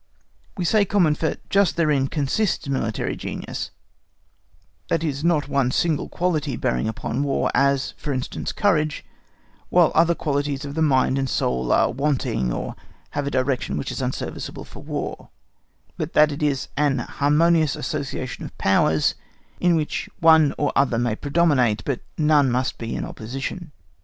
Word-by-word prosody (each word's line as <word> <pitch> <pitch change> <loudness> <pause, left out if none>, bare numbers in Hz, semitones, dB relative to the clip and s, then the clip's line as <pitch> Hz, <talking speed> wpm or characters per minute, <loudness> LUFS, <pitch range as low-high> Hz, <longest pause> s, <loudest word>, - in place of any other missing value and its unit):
We 180 - -1
say 210 +4 +4
"common," 185 -6 +3
for 160 0 -1 0.2
just 195 -3 +3
therein 150 -5 +2
consists 150 +7 -1
military 115 -5 -1
genius, - - -5 1.2
that 165 -1 0
it - - 0
is 140 0 -3
not 165 -4 +2
one 140 -3 +1
single 155 +2 0
quality 155 -6 -1
bearing 60 - 0
upon 110 +3 -3
War, 140 -1 0
as, 140 +1 +2
for 150 - -4
instance, 130 -2 -3
courage, 155 -8 +1 0.6
while 175 -3 +4
other 170 +1 +4
qualities 145 -1 -2
of 140 0 -6
mind 140 -4 +2
and 135 -1 -1
soul 65 - 0
are - - +3
wanting 135 - 0
or - - -4 0.4
have 145 -1 -2
a - - +1
direction 130 - -1
which 75 - -3
is - - -4
unserviceable - - -4
for - - -12
War, - - -5 0.7
but 155 +1 -4
that 150 0 +5
it 145 +2 -6
is 145 -3 0
AN 145 -2 +2
HARMONIOUS 150 +4 +2
ASSOCIATION - - -4
OF - - -10
POWERS, 80 -5 +3 0.5
in 175 -1 +3
which 155 -2 -2
one 160 -3 +6
or 145 - +1
other 135 -4 +2
may 120 -2 0
predominate, 140 -7 +2
but 135 -4 -1 0.2
none 150 -3 +4
must 125 +1 -1
be 115 -1 -4
in - - -3
opposition. 135 +9 -6
145 Hz, 155 wpm, -23 LUFS, 130-160 Hz, 1.2 s, one